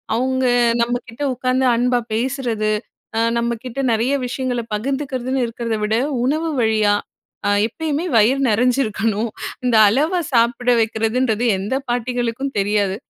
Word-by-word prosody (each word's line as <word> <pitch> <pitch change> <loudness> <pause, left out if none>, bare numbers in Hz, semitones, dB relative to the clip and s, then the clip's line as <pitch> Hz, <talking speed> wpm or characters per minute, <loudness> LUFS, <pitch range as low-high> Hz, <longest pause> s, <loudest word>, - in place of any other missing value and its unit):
அவுங்க 260 +2 0 0.4
நம்ம 235 +1 +1 0.2
கிட்ட 230 +5 -11
உக்காந்து 255 +1 0
அன்பா 245 +1 +2
பேசுறது, 235 -3 -1 0.5
அ - - +2 0.2
நம்மக்கிட்ட 235 +2 -3
நிறைய 235 +5 +1
விஷயங்கள 250 -1 -2
பகிர்ந்துக்கிறதுன்னு 260 +2 -2
இருக்கிறத 230 -1 -3
விட, 215 +1 0 0.3
உணவு 310 +5 0
வழியா 215 -2 +3 0.5
அ - - +3 0.2
எப்பயுமே 305 +7 -3
வயிறு 230 +5 +4
நிறைஞ்சிருக்கணும் 225 -2 +1 0.4
இந்த 245 -2 +2
அளவா 300 - +2
சாப்பிட 240 0 +2
வைக்கிறதுன்றது, 225 +1 0
எந்த 200 +7 -2
பாட்டிகளுக்கும் 245 +2 -2
தெரியாது. 200 -1 +1
240 Hz, 120 wpm, -20 LUFS, 220-260 Hz, 0.5 s, வயிறு